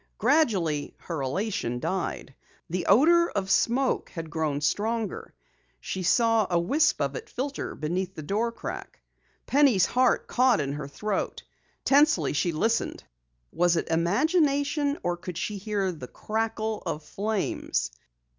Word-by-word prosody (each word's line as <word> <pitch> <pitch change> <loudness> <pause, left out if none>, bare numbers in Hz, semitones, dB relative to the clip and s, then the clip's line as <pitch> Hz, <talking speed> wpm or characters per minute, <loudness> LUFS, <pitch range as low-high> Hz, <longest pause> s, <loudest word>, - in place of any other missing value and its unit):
Gradually 205 - +1
her 165 -5 -4
elation 135 - -2
died. 180 -3 -3 0.4
The 180 0 -2
odor 340 +7 +5
of 195 -1 -2
smoke 255 +6 +2
had 165 -3 -7
grown 155 -3 -1
stronger. 215 +7 -2 0.4
She 185 - -4
saw 225 +3 +3
a 175 -1 +2
wisp 285 - +2
of - - -1
it 460 -2 -7
filter 270 +2 -4
beneath 180 +4 -3
the 155 - -7
door 215 +8 0
crack. - - -7 0.5
Penny's 270 -9 +4
heart 255 0 +2
caught 250 -2 +3
in 140 -1 -2
her 145 -1 -5
throat. 200 +7 -3 0.4
Tensely 295 +2 +4
she 170 +4 +1
listened. 220 +9 -1 0.5
Was 175 0 +2
it 165 - -2
imagination 285 - +2
or 175 0 -1
could 175 -1 -7
she 200 +4 -3
hear 200 -2 -1
the 150 -7 -8
crackle 220 - -2
of 150 - -4
flames? 205 - -2
205 Hz, 135 wpm, -27 LUFS, 170-255 Hz, 0.5 s, odor